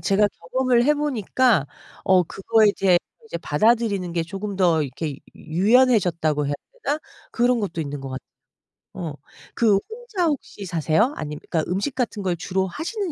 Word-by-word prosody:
제가 205 +1 +3
경험을 240 +7 +1
해 300 +3 +4
보니까 250 - +1 0.4
어 185 -1 +5
그거에 210 +4 +2
대해 185 -2 +4 0.3
이제 170 - -5
받아들이는 200 +2 +1
게 170 -1 0
쪼금 195 +3 -5
더 170 -4 +3
이렇게 140 +1 -4 0.2
유 - - -15 0.3
유연해졌다고 180 - +3
해야 145 - -1 0.3
되나 295 +2 +1 0.3
그런 245 0 +2
것도 180 -5 -3
있는 145 -2 -4
것 135 0 -7
같 130 - -5 0.7
어. 165 -4 -5 0.4
그 220 -4 +4
혼자 445 -5 -3
혹시 275 -9 -4
사세요? 170 - +1
아님 150 0 -5
그러니까 160 -1 -1
음식 200 +10 -1
같은 235 -5 -2
걸 180 -2 0
주로 190 +2 -1
하시는 345 - -4
195 Hz, 335 characters per minute, -23 LUFS, 170-245 Hz, 0.7 s, 어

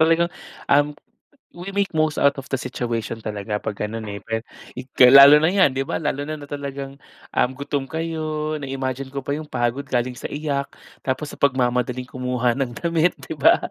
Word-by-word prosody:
Talagang, 165 +2 +3 0.4
um, 145 +1 +4 0.6
we 180 +3 -8
make 200 -1 +1
most 155 -1 +1
out 140 0 +4
of 135 - -6
the 135 - +1
situation 115 -3 -3
talaga 105 0 -3
'pag 105 - -4 0.2
ganun, 115 0 -5
eh. 100 -1 -6
Well, 115 +1 -2 0.6
lalo 140 +3 +10
na 160 - +4
yan, 185 -8 +4
'di 135 - -1
ba? 155 +5 -2
Lalo 145 -2 -2
na 155 +2 -4
na 145 - -10
talagang 140 -1 -6 0.3
um, 125 - +2
gutom 140 -1 -3
kayo 155 -1 -3
na-imagine 135 -1 -4
ko 135 -1 -6
pa 140 - -1
'yung 150 +1 -5
pagod 120 +3 -1
galing 125 -2 -1
sa - - -7
iyak. 145 -2 -2 0.3
Tapos 135 +3 -3
sa - - -13
pagmamadaling 125 -2 +1
kumuha 125 -1 -1
ng 135 0 -2
damit, 170 0 +1
'di 135 +3 -7
ba? 150 - +5
140 Hz, 185 wpm, -22 LUFS, 125-155 Hz, 0.6 s, lalo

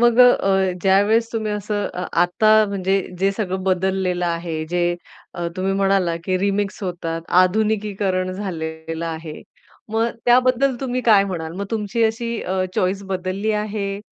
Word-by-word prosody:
मग 240 0 +4
अ, 195 -6 +4
ज्यावेळेस 205 +4 +3
तुम्ही 220 -2 -2
असं 210 0 -2
अ, 180 - -3 0.2
आता 215 +5 +4
म्हणजे 195 0 0 0.2
जे 195 +2 +2
सगळं 190 -2 -3
बदललेलं 185 -1 0
आहे 170 -2 -3
जे 175 +1 0 0.4
अ, 175 -1 -3
तुम्ही 190 +1 0
म्हणालात 195 -3 +1
की 185 +1 0
रिमिक्स 200 +1 -1
होतात, 170 -3 -3 0.2
आधुनिकीकरण 200 -1 0
झालेलं 165 -4 -5
आहे. 160 -1 -6 0.5
मग 225 +1 +1 0.2
त्याबद्दल 255 +2 +3
तुम्ही 255 -2 -2
काय 205 -3 +6
म्हणाल 165 -4 -4
मग 200 +1 -4
तुमची 225 +1 -1
अशी 230 +1 -1
अ, 185 0 -1
चॉईस 190 +2 0
बदलली 190 +3 -2
आहे? 205 -1 -3
195 Hz, 145 wpm, -21 LUFS, 180-215 Hz, 0.5 s, काय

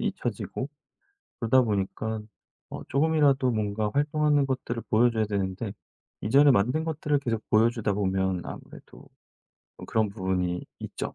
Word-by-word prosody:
잊혀지고 130 - -3 0.7
그러다 125 +2 +4
보니까 110 0 -2 0.5
어 - - -7
쪼금이라도 140 -3 +3
뭔가 105 -1 -1
활동하는 145 0 +2
것들을 125 -3 -3
보여 120 +3 +4
줘야 110 -2 0
되는데 100 0 -2 0.5
이전에 140 +6 +5
만든 125 +8 +2
것들을 150 -2 0
계속 115 -5 -2
보여 110 +2 +5
주다 110 -3 -2
보면 95 -2 0
아무래도 - - -11 0.8
그런 110 -2 +1
부분이 95 -3 -2 0.2
있죠. - - -5
115 Hz, 320 characters per minute, -27 LUFS, 100-140 Hz, 0.8 s, 이전에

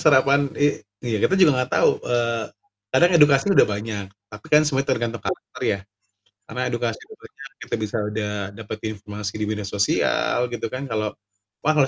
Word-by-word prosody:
sarapan 140 -1 +5 0.2
i 145 - +3 0.4
iya 115 -3 0
kita 190 - +3
juga 175 - +7
enggak 125 0 -2
tahu, - - +5
eee, 115 -2 0 0.5
kadang 175 +1 +5
edukasi 145 -1 +6
udah - - +6
banyak, 105 -1 -4 0.3
tapi 105 0 -11
kan 150 0 +7
semuanya 135 -2 0
tergantung 115 -2 -1
karakter - - -5
ya. 100 - +1 0.7
Karena 125 +3 -5
edukasi 120 0 -2
udah 435 -1 -14
banyak, 140 - -12 0.2
kita - - -1
bisa 110 +1 -3
udah 105 0 -2 0.2
dapet 110 0 -6
informasi 105 -1 -6
di - - +1
media 105 -2 -3
sosial 100 0 +1
gitu 115 -1 -3
kan, 135 +2 -4
kalau 110 -3 -1 0.5
wah, 155 - +3
kalau 140 -3 +4
115 Hz, 175 wpm, -23 LUFS, 105-140 Hz, 0.7 s, juga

